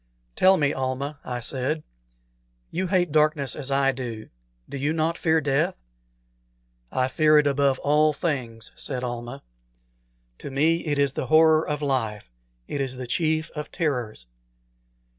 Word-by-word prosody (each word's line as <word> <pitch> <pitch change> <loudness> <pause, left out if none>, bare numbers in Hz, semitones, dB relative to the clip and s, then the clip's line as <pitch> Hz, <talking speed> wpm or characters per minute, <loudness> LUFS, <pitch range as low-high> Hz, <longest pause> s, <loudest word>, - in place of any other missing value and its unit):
"Tell 190 0 +5
me, 145 -2 +1
Almah," 135 +2 -3
I 125 -1 -4
said 130 +5 -2 0.9
"you 185 +2 -1
hate 180 -3 +1
darkness 150 -3 +2
as 140 -2 -4
I 135 0 +3
do 120 -4 -6 0.4
do - - -8
you 145 +3 0
not 165 +1 0
fear 160 -1 +2
death?" 140 -2 +1 1.2
"I 130 - +1
fear 155 +3 +4
it 150 - +4
above 140 -1 +2
all 150 +2 +3
things," 125 -8 -3
said 130 -3 -4
Almah. 120 +2 -5 1.0
"To - - -7
me 155 +5 +2
it 145 -1 0
is 140 -2 +2
the 130 - -3
horror 155 0 +5
of 150 0 -2
life; 110 - -2 0.4
it 145 - -3
is 130 -1 -2
the 130 0 -6
chief 155 +4 0
of 150 -1 -6
terrors." 125 - -2
140 Hz, 150 wpm, -25 LUFS, 130-155 Hz, 1.2 s, Tell